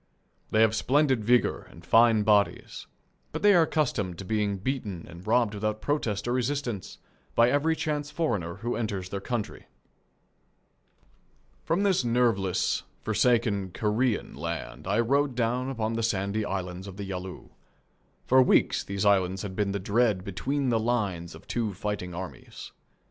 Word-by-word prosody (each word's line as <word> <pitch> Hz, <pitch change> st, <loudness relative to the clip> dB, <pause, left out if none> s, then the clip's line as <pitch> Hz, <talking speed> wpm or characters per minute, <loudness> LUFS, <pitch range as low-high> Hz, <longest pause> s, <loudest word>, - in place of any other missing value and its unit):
They 110 Hz, -, +3 dB
have 110 Hz, -1 st, +4 dB
splendid 130 Hz, 0 st, +2 dB
vigour 120 Hz, +3 st, +2 dB
and 85 Hz, +1 st, -15 dB
fine 115 Hz, 0 st, +5 dB
bodies, 105 Hz, -1 st, +1 dB, 0.5 s
but -, -, -4 dB
they 205 Hz, 0 st, +7 dB
are 175 Hz, -, +6 dB
accustomed 125 Hz, -, 0 dB
to 95 Hz, -, -7 dB
being 105 Hz, -1 st, 0 dB
beaten 100 Hz, -5 st, -4 dB
and 85 Hz, +3 st, -12 dB
robbed 115 Hz, -1 st, +3 dB
without 110 Hz, +1 st, -2 dB
protest 115 Hz, -7 st, -1 dB
or 120 Hz, -, +1 dB
resistance 125 Hz, -5 st, -2 dB, 0.4 s
by 120 Hz, +1 st, +5 dB
every 155 Hz, +3 st, +2 dB
chance 150 Hz, -2 st, -2 dB
foreigner 110 Hz, -, -2 dB
who 120 Hz, +1 st, -3 dB
enters 100 Hz, -5 st, -3 dB
their 100 Hz, 0 st, -4 dB
country. 110 Hz, -2 st, -4 dB, 2.0 s
From 175 Hz, +5 st, +1 dB
this 190 Hz, -8 st, +2 dB
nerveless, 115 Hz, -6 st, +1 dB, 0.2 s
forsaken 105 Hz, -6 st, +1 dB
Korean 110 Hz, +3 st, 0 dB
land -, -, -6 dB
I 100 Hz, +4 st, +1 dB
rode 140 Hz, +2 st, +1 dB
down 125 Hz, +2 st, 0 dB
upon 115 Hz, -4 st, -2 dB
the 115 Hz, -, -1 dB
sandy 105 Hz, -1 st, 0 dB
islands 95 Hz, -1 st, -4 dB
of 95 Hz, -1 st, -9 dB
the 100 Hz, -, -5 dB
Yalu. 95 Hz, -1 st, -6 dB, 0.8 s
For 130 Hz, +1 st, +6 dB
weeks 125 Hz, -, +3 dB
these 100 Hz, 0 st, -3 dB
islands 95 Hz, -2 st, +2 dB
had 95 Hz, -2 st, -6 dB
been 100 Hz, -1 st, 0 dB
the 100 Hz, -, -1 dB
dread 105 Hz, -1 st, +1 dB
between 130 Hz, +9 st, -2 dB
the 115 Hz, -2 st, +2 dB
lines 100 Hz, -8 st, -1 dB
of 80 Hz, -, -14 dB
two 110 Hz, -5 st, -2 dB
fighting 95 Hz, -3 st, -4 dB
armies. 85 Hz, -8 st, -8 dB
110 Hz, 155 wpm, -27 LUFS, 95-125 Hz, 2.0 s, they